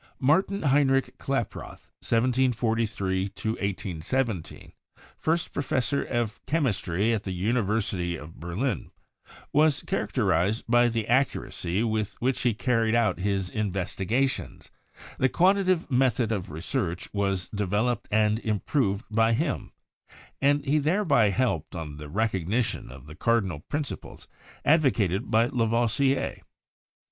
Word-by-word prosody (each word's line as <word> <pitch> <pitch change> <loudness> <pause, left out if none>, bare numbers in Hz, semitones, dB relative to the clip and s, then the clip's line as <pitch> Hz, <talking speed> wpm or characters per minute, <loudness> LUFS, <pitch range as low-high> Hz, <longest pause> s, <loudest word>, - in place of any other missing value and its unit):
Martin 185 +8 +2
Heinrich 135 -2 +2
Klaproth 135 -5 -4
(1743 115 -5 +1
1817), 100 0 -3 0.4
first 165 +1 -1
Professor 140 0 0
of 120 -3 -2
Chemistry 115 - +1
at 110 - 0
the 95 - -5
University 100 -3 0
of 80 +1 -11
Berlin, 90 - -2 0.6
was 150 0 +3
character - - 0
ized 100 +6 +1
by 120 +1 +5
the 115 -2 -1
accuracy 115 -6 0
with 110 -2 -2
which 130 +2 0
he 120 -3 +1
carried 115 -1 +1
out 115 -5 +2
his 95 -1 -1
investi 95 -2 -2
gations; 130 +3 -1 0.5
the 130 - +3
quantitative 185 0 +2
method 125 -3 +2
of 100 -5 -2
research 85 - -3
was 100 -2 -1
devel 105 +3 0
oped 120 - -5
and 110 0 +2
improved 110 0 0
by 115 +1 +3
him, - - -1 0.7
and 145 +1 +3
he 150 +2 +3
thereby 155 - +3
helped 100 - -1
on 75 -3 -6
the 75 -1 -8
recognition 105 - -1
of 65 +1 -12
the 75 - -10
cardinal 95 -3 0
principles 145 -1 -5 0.4
advocated 120 - +2
by 115 +1 +4
La 120 -1 0
voisier. 130 +4 +1
115 Hz, 120 wpm, -27 LUFS, 95-130 Hz, 0.7 s, by